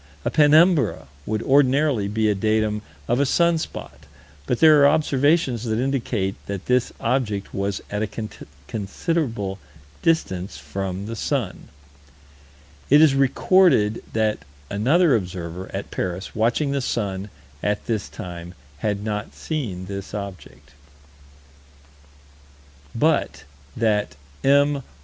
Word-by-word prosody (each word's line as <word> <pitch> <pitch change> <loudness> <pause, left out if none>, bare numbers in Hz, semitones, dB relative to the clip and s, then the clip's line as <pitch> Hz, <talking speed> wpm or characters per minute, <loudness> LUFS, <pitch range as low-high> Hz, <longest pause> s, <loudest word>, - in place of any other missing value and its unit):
A - - 0
penumbra 155 - +4 0.2
would 110 +1 -1
ordinarily 135 -4 +3
be 110 +2 0
a 105 - +3
datum 110 +1 0 0.3
of 120 +2 +1
a 140 - +3
sun 170 +2 +3
spot, - - -8 0.4
but 125 - 0
there 155 -2 +7
are 140 - +8
observations 145 -4 +2
that 110 -1 -1
indicate 120 -6 -1
that 100 -2 -5
this 125 -1 +1
object 115 -5 -1
was 100 0 -2
at 105 0 -2
a 110 - -1 0.6
considerable 110 - -2 0.4
distance 95 - 0
from 95 +7 -4
the 115 +2 -5
sun: 120 -3 -3 1.2
It 145 - +7
is 155 -3 +6
recorded 135 - +3
that 110 -1 +1 0.3
another 140 - +3
observer, 90 -2 -4
at - - -5
Paris, 90 +1 -4
watching 120 +6 +1
the 140 -1 0
sun, 100 -5 -2 0.3
at 105 0 -1
this 110 -3 -2
time, 90 -3 -8 0.2
had 105 -1 -1
not 105 -1 -4
seen 110 - -4
this 100 +1 -6
object: 90 -8 -8 2.2
But - - +1 0.3
that 105 -8 +1 0.3
M. 140 +1 +4
110 Hz, 120 wpm, -23 LUFS, 100-140 Hz, 2.2 s, are